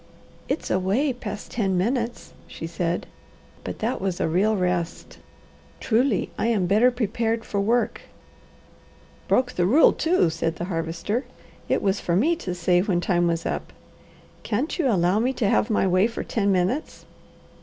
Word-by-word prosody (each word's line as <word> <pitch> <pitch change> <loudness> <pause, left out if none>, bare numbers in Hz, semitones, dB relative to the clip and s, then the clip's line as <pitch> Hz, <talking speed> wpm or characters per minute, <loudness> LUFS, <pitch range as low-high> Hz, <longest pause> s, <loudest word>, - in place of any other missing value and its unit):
"It's - - -2
away 200 +10 +1
past 210 -4 -7
ten 195 -5 0
minutes," 235 +4 -2
she - - -7
said, 170 +1 -2 0.6
"but - - -5
that 225 +3 -2
was 190 -2 -2
a - - +1
real 200 +6 +2
rest. 180 -2 -2 0.6
Truly, 235 -1 +1
I - - +1
am 215 -6 +1
better 215 +7 +4
prepared 230 -1 -1
for 200 - -1
work." 235 +4 0 1.3
"Broke 250 0 +2
the 175 -1 +1
rule, 285 +11 +6
too!" 320 - +2
said 165 0 -2
the 170 - -4
Harvester. 175 +7 -2 0.4
"It - - +1
was, 195 0 +1
for 170 - -1
me 300 - +3
to 180 - -4
say 175 0 +2
when 185 -3 0
time 175 -1 +1
was 165 0 -1
up. - - -3 0.7
Can't 255 - -2
you 305 - +2
allow 185 -1 +2
me 250 +4 +1
to 230 -5 0
have 205 - +2
my 210 - +2
way 185 +3 +3
for 230 - -5
ten 200 -3 0
minutes?" 190 - -1
200 Hz, 165 wpm, -24 LUFS, 180-235 Hz, 1.3 s, rule